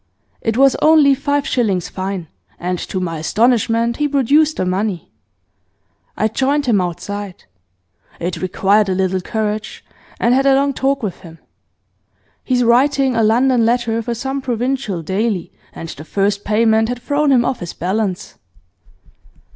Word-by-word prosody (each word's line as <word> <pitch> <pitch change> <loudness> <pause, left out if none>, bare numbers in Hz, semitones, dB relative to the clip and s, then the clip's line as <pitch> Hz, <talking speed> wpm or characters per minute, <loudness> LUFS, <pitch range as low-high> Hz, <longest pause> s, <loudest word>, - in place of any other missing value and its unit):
It 225 0 -1
was 270 0 +5
only 305 -3 +5
five 285 +1 -1
shillings 195 -8 0
fine, 190 -2 -5 0.3
and 180 0 -3
to 190 - -4
my 165 -3 -3
astonishment 230 +4 +1
he 295 - +1
produced 290 +3 +2
the - - -1
money. 185 0 -2 1.1
I 215 - +2
joined 275 +6 0
him 220 -6 +2
outside 185 +2 -5 0.8
it 175 +2 -4
required 195 +2 +2
a 185 - 0
little 190 0 0
courage 215 +1 -4 0.3
and 240 - +3
had 270 +2 +2
a 270 - +5
long 280 +1 +1
talk 270 0 -1
with 190 -4 -4
him. 165 -3 -13 1.1
He's 250 -2 +1
writing 265 +2 +3
a 230 - +2
London 240 +3 +3
Letter 230 -1 +1
for 235 +1 -3
some 270 +3 -3
provincial 245 -6 -2
daily, 190 +1 -2 0.2
and 165 - -8
the 155 - -9
first 200 +4 -1
payment 220 +1 +2
had 245 0 -3
thrown 290 +2 0
him 245 -3 +4
off 255 - -1
his 175 -2 -6
balance. 190 +1 -3
225 Hz, 150 wpm, -18 LUFS, 190-265 Hz, 1.1 s, was